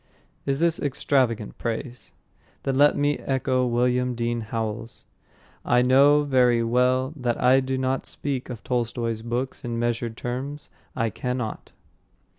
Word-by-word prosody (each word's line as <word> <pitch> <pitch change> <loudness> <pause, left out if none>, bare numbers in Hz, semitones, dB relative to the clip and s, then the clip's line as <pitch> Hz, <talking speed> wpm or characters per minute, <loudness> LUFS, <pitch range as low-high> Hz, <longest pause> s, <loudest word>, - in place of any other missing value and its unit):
Is 135 0 0
this 170 0 +3
extravagant 130 -6 0
praise? 120 +2 -5 0.5
Then 135 - 0
let 145 +2 +4
me 145 0 +1
echo 130 -1 0
William 125 +1 +1
Dean 120 0 -1
Howells: 110 0 -5 0.6
"I 125 0 +3
know 140 +3 +5
very 125 -4 +3
well 125 +3 +2
that 125 -4 -2
I 130 +2 +5
do 130 0 -2
not 130 0 -1
speak 135 -3 -4
of 115 -3 -7
Tolstoy's 115 -2 -2
books 120 +3 -3
in 120 -2 -3
measured 120 -1 -2
terms; 135 +4 -5 0.2
I 115 -3 0
cannot." 125 0 -4
125 Hz, 135 wpm, -25 LUFS, 120-135 Hz, 0.6 s, know